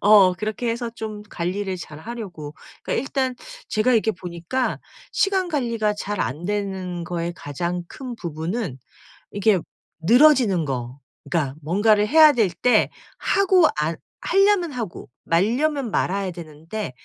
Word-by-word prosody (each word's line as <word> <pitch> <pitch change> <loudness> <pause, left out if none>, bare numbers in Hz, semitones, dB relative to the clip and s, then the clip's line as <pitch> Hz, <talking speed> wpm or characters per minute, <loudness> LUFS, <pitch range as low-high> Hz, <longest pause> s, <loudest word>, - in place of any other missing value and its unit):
어 200 -3 +7
그렇게 215 +5 -3
해서 235 0 -3
좀 215 -1 -6
관리를 185 +2 -2
잘하려고. 165 -3 -8 0.3
그러니까 - - -1
일단 265 -2 -1 0.3
제가 230 +2 +2
이렇게 220 -1 +3
보니까 180 +7 -3 0.3
시간 385 -2 +2
관리가 235 -9 0
잘 205 0 -3
안 150 +7 -2
되는 190 -4 -3
거의 170 -1 -3
가장 170 +5 -3
큰 255 -3 -7
부분은 170 - -4 0.6
이렇게 205 -2 +3 0.5
늘어지는 245 - +5
거. 125 -1 -4 0.3
그러니까 145 -6 0
뭔가를 205 +6 +3
해야 310 +3 +7
될 225 -7 +2
때 240 +8 +3 0.3
하고 375 -4 +4
안 155 +2 0 0.3
하려면 390 -3 +3
하고 225 -8 -5 0.2
말려면 245 - +1
말아야 195 0 0
되는데 165 +3 -7
205 Hz, 285 characters per minute, -23 LUFS, 170-245 Hz, 0.6 s, 어